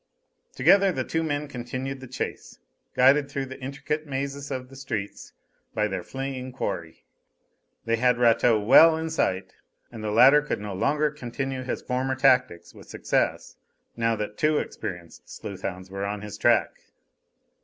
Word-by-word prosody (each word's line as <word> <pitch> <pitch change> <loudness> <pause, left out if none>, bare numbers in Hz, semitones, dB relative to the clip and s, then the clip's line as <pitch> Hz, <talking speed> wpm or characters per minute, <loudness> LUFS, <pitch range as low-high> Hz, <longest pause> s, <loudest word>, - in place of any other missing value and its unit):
Together 195 -1 +5
the - - -2
two 160 - -2
men 150 -2 -2
continued 130 +1 -5
the 130 - -10
chase, - - -6 0.4
guided 140 +3 +4
through 135 -1 -3
the 130 0 -10
intricate 150 +3 -4
mazes 140 +1 -4
of 130 -1 -4
the 135 - -13
streets 110 -7 -5 0.4
by 105 0 +1
their 95 -3 -3
fleeing 130 +4 -5
quarry. 85 -10 -5 0.8
They 115 0 +1
had 125 +1 +3
Rateau 115 -1 +4
well 160 +9 +7
in 160 0 -4
sight, 95 - -1 0.4
and 115 -2 -8
the 105 - -2
latter 135 +7 +7
could 150 - -3
no 105 -1 -6
longer 150 +9 +1
continue 135 -1 -4
his 130 - -4
former 130 +1 -1
tactics 130 -10 +2
with - - -15
success - - -1 0.4
now 115 -1 +1
that 105 0 -5
two 150 0 +3
experienced 90 - -6
sleuth - - -8
hounds 95 +1 -6
were 100 0 -4
on 100 0 -3
his 105 -1 -7
track. - - +2
130 Hz, 160 wpm, -25 LUFS, 105-140 Hz, 0.8 s, well